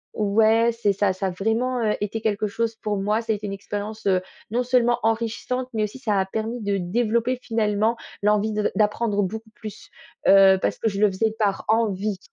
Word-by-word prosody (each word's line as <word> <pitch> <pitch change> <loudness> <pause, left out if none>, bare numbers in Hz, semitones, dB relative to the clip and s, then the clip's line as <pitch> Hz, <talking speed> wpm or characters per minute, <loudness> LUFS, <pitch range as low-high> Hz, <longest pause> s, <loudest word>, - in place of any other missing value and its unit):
ouais 220 +2 +3
c'est 220 -3 0
ça, 200 0 +1
ça 190 +1 -2
a - - 0
vraiment, 230 +6 -1
heu, 210 -1 +1
été 210 +2 -3
quelque 215 -1 0
chose 225 +2 -2
pour 210 -1 -2
moi, 210 +3 0
ça 225 -1 -1
a - - -1
été 210 0 -6
une 195 - -4
expérience, 205 +2 -6
heu, 185 -1 +3 0.3
non 245 - +1
seulement 240 -1 +2
enrichissante, 230 +3 -1
mais 215 -1 0
aussi 210 +5 -4
ça 210 -6 0
a 190 - +1
permis 220 +4 -4
de 200 -1 0
développer 235 +6 0
finalement 220 0 0 0.3
l'envie 210 +1 +2
de 210 0 0
d'apprendre 210 -1 +1
beaucoup 220 +4 -5
plus, 215 -2 -10 0.4
heu, 195 -1 +7
parce - - 0
que 225 - 0
je 200 0 -4
le 210 - +6
faisais 215 +3 0
par 205 -3 0
envie. 210 -3 0
215 Hz, 205 wpm, -23 LUFS, 205-230 Hz, 0.4 s, heu